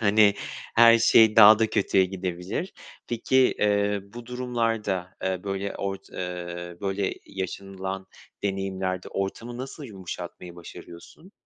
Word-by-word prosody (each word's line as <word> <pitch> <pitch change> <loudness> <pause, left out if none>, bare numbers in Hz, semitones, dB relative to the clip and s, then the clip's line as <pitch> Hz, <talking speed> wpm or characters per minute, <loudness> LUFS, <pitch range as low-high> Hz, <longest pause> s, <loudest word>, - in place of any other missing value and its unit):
Hani, 105 -1 +5 0.4
her 115 0 +7
şey 110 -1 +5
daha 110 0 +9
da 115 - +3
kötüye 95 -1 +3
gidebilir. 90 - -4 0.3
Peki, 120 +2 -1 0.2
eee, 105 -1 +2
bu 115 +4 -11
durumlarda, 115 -7 -2
eee, 95 0 -2
böyle 100 0 -3
ort 95 0 -5
eee 90 -1 -6
böyle 100 0 -1
yaşanılan 95 0 -5 0.4
deneyimlerde 95 -2 -2
ortamı 115 +5 -4
nasıl 135 +3 -7
yumuşatmayı 95 -4 -8
başarıyorsun? 85 - -12
100 Hz, 115 wpm, -26 LUFS, 95-110 Hz, 0.4 s, daha